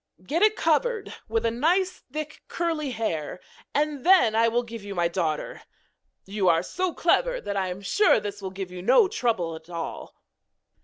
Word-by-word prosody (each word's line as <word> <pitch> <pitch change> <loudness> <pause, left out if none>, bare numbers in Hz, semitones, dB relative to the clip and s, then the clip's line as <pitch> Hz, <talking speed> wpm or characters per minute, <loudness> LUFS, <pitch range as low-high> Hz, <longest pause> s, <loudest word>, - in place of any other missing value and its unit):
Get 320 - -1
it 430 0 +5
covered 410 +7 0
with 225 +1 -1
nice 335 +11 +1
thick 300 0 -6
curly 325 -4 -2
hair, 180 - -3 0.3
and 295 -2 -1
then 355 -11 +5
I 225 +1 +4
will 240 +2 +1
give 230 -2 -9
you 200 -1 -6
my 175 -1 +2
daughter. 170 -3 -2 0.6
You 195 -2 +1
are 165 0 +3
so 370 - -2
clever - - +1
that 200 - -4
I 190 -1 0
am 180 +2 -5
sure 405 - +3
this 205 0 -6
will 190 - -4
give 190 -1 -6
you 180 0 -7
no 410 - +5
trouble 225 - -1
at 160 +1 -13
all.' 170 -1 -6
230 Hz, 175 wpm, -26 LUFS, -, 0.6 s, it